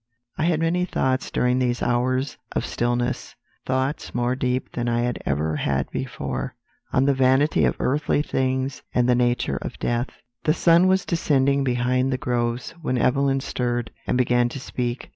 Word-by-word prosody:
"I 155 - 0
had 170 -2 +2
many 170 +2 +1
thoughts 130 -7 0
during 125 +1 +1
these 125 -1 0
hours 130 +2 0 0.2
of - - -1
stillness 120 +1 -1 0.3
thoughts 130 +3 -1
more 120 +1 +1
deep 130 0 -1
than 120 0 -2
I 120 0 +1
had 120 0 -2
ever 75 +2 0
had 70 -1 -1
before, 65 -2 -4 0.4
on 130 - +3
the 140 - +4
vanity 135 +3 +3
of - - +1
earthly 145 +2 +1
things 130 -1 -1
and 125 0 +3
the 125 - +5
nature 120 0 +1
of - - -6
death. 120 +2 -1 0.4
"The 155 - +3
sun 170 +1 +5
was 190 0 +2
descending 140 -4 +2
behind 125 +1 +1
the 130 - 0
groves 120 -1 -1
when 130 -5 -1
Evelyn 135 +2 +2
stirred, 120 -2 -2 0.2
and - - +1
began 120 -1 +3
to 135 - -6
speak. 125 -1 -4
125 Hz, 170 wpm, -24 LUFS, 120-135 Hz, 0.4 s, the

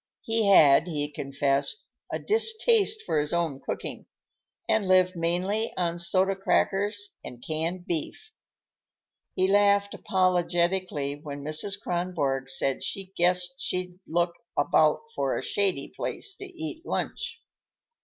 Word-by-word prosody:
He 225 -2 0
had, 155 -4 +6
he 150 -3 -3
confessed, 140 - -1 0.3
a - - -1
distaste 445 0 +3
for 155 - 0
his 150 +2 -1
own 165 -6 -1
cooking, - - -5 0.6
and 210 -3 +1
lived 185 0 +4
mainly 180 +6 -1
on 175 -1 -1
soda 190 +3 +2
crackers 205 +1 0
and 120 -1 -10
canned 165 +3 -2
beef. 175 - -4 1.0
He 185 - +2
laughed 200 0 +3
apologetically 175 -5 0
when 145 -2 -7
Mrs. 155 +7 -2
Kronborg 165 -8 -2
said 135 0 +1
she 195 -1 -5
guessed 180 0 0
she'd 180 0 -3
look 170 +1 +1 0.2
about - - +3
for - - -1
a - - -4
shady 190 -9 0
place 405 - -4
to 395 - -8
eat 330 -3 -7
lunch. - - -3
180 Hz, 125 wpm, -27 LUFS, 155-200 Hz, 1.0 s, had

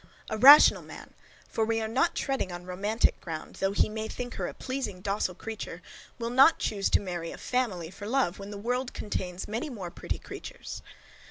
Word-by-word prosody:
A 220 - -1
rational 285 +5 +9
man, - - -12 0.3
for 225 - -1
we 225 0 +1
are 220 - -2
not 265 +10 +1
treading 270 -9 -1
on 175 0 -7
romantic 200 +5 0
ground, 160 -3 -7
though 195 0 +1
he 200 - +2
may 220 0 -4
think 245 +1 -6
her - - -3
a - - -6
pleasing 255 -8 -4
docile 195 -1 -1
creature, 205 -5 -7 0.3
will 235 0 -3
not 270 +6 +6
choose 200 -2 -1
to - - +4
marry 175 -4 -5
a - - -8
FAMILY 200 -10 -2
for 205 +2 -8
love, 235 -7 +1
when 200 0 -7
the 205 - -6
world 245 +4 -2
contains 185 -3 -4
many 230 +8 -3
more 195 -9 -6
pretty - - -4
creatures. - - -8
215 Hz, 195 wpm, -28 LUFS, 185-245 Hz, 0.3 s, rational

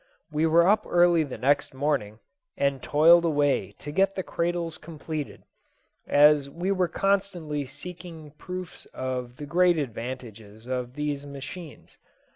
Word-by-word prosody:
We 155 +2 +1
were 170 +2 +5
up 210 +2 +3
early 175 -1 +4
the 140 -4 -6
next 140 +1 +1
morning, 130 -7 -1 0.4
and 140 -1 0
toiled 165 +3 +5
away 145 - +1
to 145 - -7
get 195 +4 +2
the 190 - -2
cradles 170 -2 -2
completed, 155 -2 -6 0.6
as 145 -1 +5
we 175 +6 -2
were 185 -2 +2
constantly 180 -8 -1
seeing 160 +1 -10
proofs 180 +4 -8
of 125 -1 -4
the 145 - -6
great 175 +3 +3
advantages 115 -5 -6
of 125 0 -4
these 145 -1 -3
machines. 145 +4 -10
150 Hz, 135 wpm, -26 LUFS, 135-175 Hz, 0.6 s, were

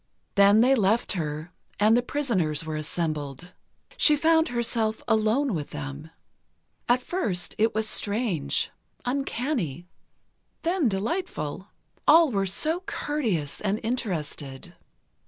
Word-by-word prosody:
Then 200 +2 +6
they 255 +3 +5
left 225 -1 +2
her, 155 -2 -3 0.3
and 215 +2 +5
the 245 - +4
prisoners 190 - 0
were 155 -1 -3
assembled. 155 0 -3 0.4
She 300 - +5
found 320 +2 +3
herself 230 -3 -1
alone 220 +4 +2
with 150 -4 -3
them. 145 +1 -7 0.8
At 250 +1 +3
first, 205 - -2
it 220 0 +2
was 220 0 +1
strange, 200 - -1 0.3
uncanny, 245 - -2 0.8
then 335 -6 +2
delightful. 195 - -3 0.4
All 320 -2 +7
were 195 -3 0
so 310 - +1
courteous 215 - -2
and 210 +1 0
interested. 160 - -4
215 Hz, 115 wpm, -26 LUFS, 160-255 Hz, 0.8 s, All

